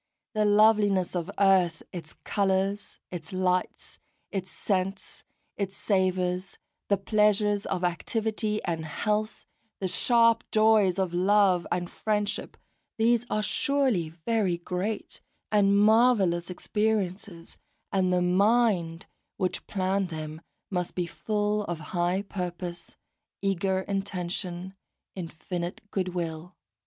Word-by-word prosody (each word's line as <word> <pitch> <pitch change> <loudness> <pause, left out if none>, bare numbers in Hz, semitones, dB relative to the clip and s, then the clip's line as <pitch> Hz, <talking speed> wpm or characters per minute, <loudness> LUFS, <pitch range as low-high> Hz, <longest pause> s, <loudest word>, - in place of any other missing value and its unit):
The 215 -1 +2
loveliness 205 -3 +4
of 175 +1 -2
earth, 185 -4 +3
its 165 -4 -8
colours, 195 0 0
its 170 -4 -7
lights, 185 -1 -1 0.3
its 190 -2 -3
scents, 195 0 -3 0.3
its 195 -1 -3
savours, 185 -2 0 0.3
the 200 - +3
pleasures 210 0 +2
of 180 -1 -2
activity 215 +4 -1
and 165 -2 -2
health, 210 +7 -2 0.3
the 190 - -1
sharp 230 +3 +3
joys 215 -4 +4
of 190 -3 -1
love 185 -1 +3
and 175 0 -1
friendship, 210 +2 -2 0.4
these 235 +1 +2
are 215 - 0
surely 260 - +1
very 180 +2 0
great 180 +5 -4 0.3
and 200 -1 +4
marvellous 210 -5 +4
experiences, 195 -3 -2 0.3
and 185 -2 +2
the 180 0 +2
Mind 185 -3 +2 0.3
which 185 -1 -2
planned 190 -1 0
them 155 -1 -6 0.3
must 180 -2 -2
be 180 - 0
full 210 +3 -1
of 175 -3 -4
high 175 +2 +1
purpose, 175 -3 -6 0.5
eager 190 -1 +1
intention, 185 -2 -4 0.4
infinite 175 0 -5
goodwill. 175 -2 -3
190 Hz, 110 wpm, -27 LUFS, 180-210 Hz, 0.5 s, loveliness